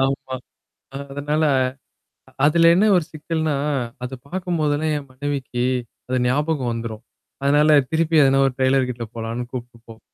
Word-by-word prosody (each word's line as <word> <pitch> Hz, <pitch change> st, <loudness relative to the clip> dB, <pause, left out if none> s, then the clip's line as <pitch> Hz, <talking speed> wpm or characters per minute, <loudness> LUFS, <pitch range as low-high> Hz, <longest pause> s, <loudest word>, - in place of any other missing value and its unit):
ஆமா, 135 Hz, -1 st, -1 dB, 0.8 s
அதனால 150 Hz, +2 st, -1 dB, 1.0 s
அதுல 165 Hz, +2 st, +5 dB
என்ன 200 Hz, +4 st, +4 dB
ஒரு 175 Hz, -, +1 dB
சிக்கல்னா, 160 Hz, 0 st, -2 dB, 0.5 s
அத 125 Hz, -, -5 dB
பார்க்கும்போதெல்லாம் 155 Hz, -3 st, -1 dB
என் 140 Hz, -2 st, -8 dB
மனைவிக்கு, 130 Hz, -2 st, -3 dB, 0.5 s
அது 130 Hz, -, +1 dB
ஞாபகம் 140 Hz, -1 st, 0 dB
வந்துரும். 115 Hz, -1 st, -5 dB, 0.4 s
அதனால 150 Hz, +2 st, +4 dB, 0.2 s
திருப்பி 160 Hz, 0 st, +1 dB
அதன 135 Hz, 0 st, +4 dB
ஒரு 135 Hz, -, 0 dB
டெய்லர் 130 Hz, 0 st, +3 dB
கிட்ட 120 Hz, -1 st, -4 dB
போலான்னு 115 Hz, +2 st, -4 dB
கூப்ட்டு 120 Hz, -2 st, -7 dB
போவா 115 Hz, 0 st, -12 dB
140 Hz, 130 wpm, -22 LUFS, 125-155 Hz, 1.0 s, அதுல